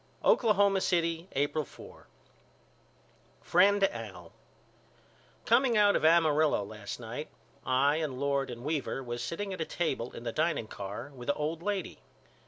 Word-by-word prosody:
Oklahoma 200 -4 +4
City, 170 -1 0
April 145 +3 0
4. - - -14 1.4
FRIEND 200 +3 +4
AL: 195 - -3 1.1
Coming 255 -4 +4
out 205 -1 +5
of - - 0
Amarillo 155 -6 +4
last 105 +1 -7
night 120 +6 -6 0.4
I 140 +4 +3
and 150 -5 -3
Lord 140 -1 0
and 120 -1 -8
Weaver 145 -2 -2
was 120 -1 -5
sitting 190 +10 -4
at 185 - -5
a - - +2
table 135 -10 -2
in - - -8
the 115 - -3
dining 155 -3 0
car 105 +6 -7
with 125 0 -8
a 145 - +2
old 155 +2 -3
lady. 200 -1 -3
155 Hz, 145 wpm, -30 LUFS, 125-175 Hz, 1.4 s, out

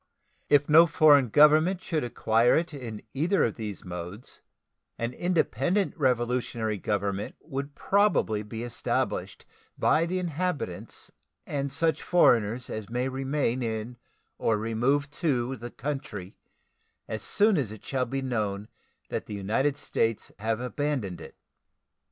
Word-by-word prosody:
If 145 0 +4
no 165 +3 +7
foreign 145 -5 +5
government 155 - +5
should 165 -4 -2
acquire 115 0 +3
it 165 0 -2
in 115 -7 -7
either 170 +8 +2
of 115 - -1
these 105 -4 -6
modes, 90 +5 -8 0.6
an 115 +1 -3
independent 180 0 0
revolutionary 120 -5 0
government 100 0 -2
would 140 +1 -6
probably 200 - +2
be 110 +2 -6
established 120 -1 -2 0.3
by 165 +2 +3
the 185 +2 -1
inhabitants 175 - -3 0.3
and 140 -1 -3
such 165 +2 +1
foreigners 120 -8 +3
as 110 -1 -6
may 125 +2 -1
remain 135 -1 -1
in 110 +1 -3 0.4
or 110 - +2
remove 120 +7 +1
to 130 -5 0
the 120 -1 -7
country 135 -9 -5 0.7
as 110 -1 -4
soon 210 - +3
as 130 - -1
it 110 - -11
shall 130 -2 0
be 135 +2 -3
known 105 -5 -2 0.4
that - - -4
the 105 - -5
United 125 +9 0
States 115 -5 -1
have 110 +1 -1
abandoned 125 -7 -2
it. - - -11
125 Hz, 135 wpm, -27 LUFS, 110-150 Hz, 0.7 s, no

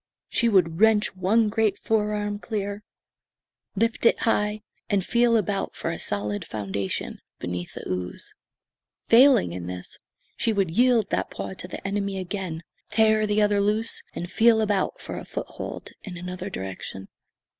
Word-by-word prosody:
She 235 - +2
would 180 -4 +2
wrench 220 -3 +4
one 210 +5 +3
great 215 -2 +1
fore 210 -1 0
arm 205 0 -2
clear, 205 -2 -3 0.9
lift 230 +3 +2
it - - +3
high, 210 -1 +1 0.3
and 195 -2 +1
feel 235 -1 +4
about 200 -1 -1
for 165 - -2
a 165 - -5
solid 105 0 -2
foundation 100 -2 -4 0.2
beneath 90 0 -5
the - - -7
ooze. 90 -1 -4 0.8
Failing 245 - +6
in 85 0 -5
this, 90 0 -8 0.4
she 225 - +1
would 195 -5 +1
yield 240 -4 +4
that - - 0
paw - - -5
to 180 - -7
the 185 - -6
enemy 200 0 -1
again, 185 -3 -4 0.3
tear 215 0 +4
the 210 0 +3
other 205 -1 +3
loose, 215 +3 +1
and 175 +1 -5
feel 225 0 +5
about 205 -3 0
for - - -6
a - - -8
foothold - - -6
in 185 -4 -8
another 180 +2 -5
direction. 95 - -6
200 Hz, 155 wpm, -25 LUFS, 170-220 Hz, 0.9 s, Failing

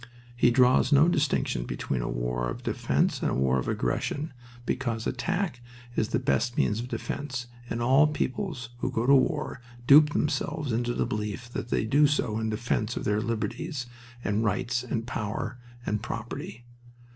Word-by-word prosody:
He 120 - +4
draws 125 +1 +4
no 145 +3 +6
distinction 145 - +1
between 65 -3 -2
a - - -2
war - - -1
of - - -6
defense - - 0
and - - +1
a - - -1
war 65 0 +2
of - - -4
aggression, 145 0 -1 0.3
because 115 -3 -2
attack 165 +2 -1 0.3
is 110 - +1
the 115 - 0
best 125 -1 0
means 105 +1 +2
of 120 - -4
defense, 135 -1 -4 0.2
and 115 +1 -2
all 135 +5 +6
peoples 150 - -3
who 125 - -1
go 115 -1 0
to 140 - +6
war 140 -1 +2 0.2
dupe 150 +3 +8
themselves 150 -1 -1
into 120 +2 0
the - - +1
belief 105 +3 -4
that 120 - -4
they - - +1
do 145 +6 +5
so 115 -7 0
in 110 0 -1
defense 110 0 -1
of - - -3
their 105 +1 +1
liberties, 125 +6 -3 0.4
and 105 +3 +1
rights, 120 +4 0
and 115 -2 -3
power, 115 +1 -3 0.3
and 105 0 -1
property. 115 0 -6
120 Hz, 170 wpm, -28 LUFS, 110-140 Hz, 0.4 s, dupe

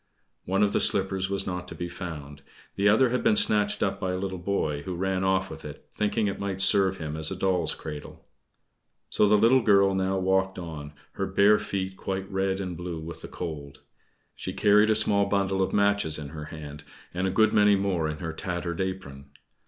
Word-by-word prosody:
One 95 +3 +1
of 105 - +1
the - - +2
slippers 95 0 +1
was 100 0 -1
not 90 -1 -4
to - - -8
be 85 - -4
found; 75 -5 -8 0.3
the 100 +1 +3
other 120 +5 +4
had 125 - 0
been 220 -1 +4
snatched 105 - +2
up 95 -1 -1
by 95 -2 -2
a - - -2
little 95 -1 -4
boy, 85 -6 -1
who 90 +3 -5
ran 95 +1 -1
off 95 -1 +1
with 80 0 -9
it 75 -1 -10
thinking 105 +1 0
it 100 - -2
might 100 -1 -3
serve 95 0 +3
him 75 -3 -5
as 80 0 -1
a 95 - -4
doll's 95 -1 0
cradle. 75 -2 -9 0.9
So 105 - +4
the 105 +1 +5
little 120 +5 +5
girl 100 -3 +4
now 95 0 0
walked 95 0 +1
on, 80 -4 -7 0.2
her - - -3
bare 105 +1 +4
feet 95 -2 -4
quite 95 0 -4
red 95 0 0
and 90 -3 -4
blue 85 -1 -5
with 80 0 -8
the - - -7
cold. 75 -5 -7 0.5
She - - -5
carried 105 +1 +4
a 110 - +4
small 100 -2 +2
bundle 95 -1 0
of 95 - 0
matches 100 -6 +1
in 75 -2 -7
her 75 0 -7
hand, 75 -2 -9 0.3
and 90 +2 -1
a - - +1
good 110 +4 +3
many 105 -1 +5
more 95 -5 0
in 75 - -4
her 80 0 -5
tattered 85 -1 -4
apron. 70 -8 -5
95 Hz, 210 wpm, -26 LUFS, 85-100 Hz, 0.9 s, the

